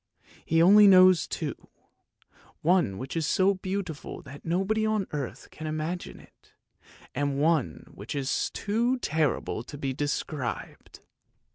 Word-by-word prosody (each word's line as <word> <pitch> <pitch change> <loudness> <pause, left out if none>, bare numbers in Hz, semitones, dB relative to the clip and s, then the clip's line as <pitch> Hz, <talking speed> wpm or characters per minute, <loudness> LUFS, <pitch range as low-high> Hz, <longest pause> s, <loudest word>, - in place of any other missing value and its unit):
He 165 +1 +3
only 205 +3 +8
knows 185 -3 +6
two, - - -3 1.1
one 170 - +2
which 130 +6 -6
is 160 -2 0
so 190 +4 +3
beautiful 185 -5 -5
that 145 +2 -12
nobody 195 +6 0
on 215 -2 0
earth 145 -4 -5
can 155 - -7
imagine 155 +3 -4
it, - - -22 0.6
and 140 0 -1
one 150 - +1
which 105 +8 -7
is 135 -2 -1
too 235 +5 -1
horrible 155 -7 0
to 135 +5 -10
be 135 -2 -3
described! 145 -2 -4
160 Hz, 130 wpm, -27 LUFS, 145-190 Hz, 1.1 s, only